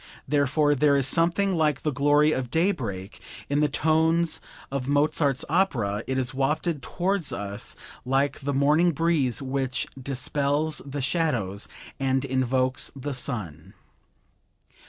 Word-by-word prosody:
Therefore 145 +1 +2
there 145 0 +3
is 135 - +1
something 175 +6 +2
like 150 -4 +1
the 150 - +1
glory 145 +3 +3
of 130 -5 -2
daybreak 115 - -1 0.3
in 145 +1 +1
the 150 0 +3
tones 160 +3 +2 0.3
of 135 -2 -3
Mozart's 145 -1 +1
opera; 120 - 0
it 130 - -1
is 130 0 -1
wafted 145 +3 0
towards 180 +2 -1
us 100 -4 -5 0.3
like 135 +2 0
the 140 +1 -2
morning 150 +5 +3
breeze 145 -6 +1
which 130 -1 -1 0.2
dispels 140 +3 0
the 140 0 -5
shadows 125 - -1 0.3
and 135 0 +1
invokes 130 0 +1
the 140 +1 -4
sun." 105 - -5
140 Hz, 130 wpm, -26 LUFS, 130-155 Hz, 0.3 s, there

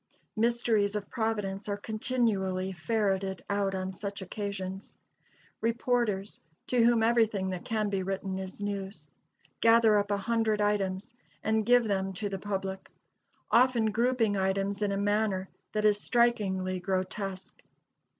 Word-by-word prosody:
"Mysteries 225 -2 +2
of 205 -1 -4
Providence" 210 -4 -2
are 200 - -1
continually 205 -4 -1
ferreted 190 0 -1
out 200 -1 0
on 190 0 -3
such 200 +1 -5
occasions. 195 0 -5 0.7
Reporters, 230 -3 0 0.3
to 245 -2 +2
whom 230 -1 +4
everything 220 -5 +2
that 180 -1 -5
can 215 -2 0
be 195 -1 -1
written 190 0 -3
is 190 +2 -7
news, 200 -4 -4 0.5
gather 225 -2 +5
up 200 0 -2
a 205 - +1
hundred 220 0 0
items 205 0 0 0.3
and 220 0 +1
give 245 0 +6
them 195 -3 -1
to 205 +2 -3
the 195 -1 -4
public; 195 -1 -4 0.6
often 235 -3 +4
grouping 230 -1 +2
items 195 +1 0
in 205 -1 +1
a 195 - -1
manner 205 -2 0 0.3
that 215 0 0
is 205 -1 +4
strikingly 195 -6 +1
grotesque. 190 +1 -3
205 Hz, 135 wpm, -29 LUFS, 190-220 Hz, 0.7 s, give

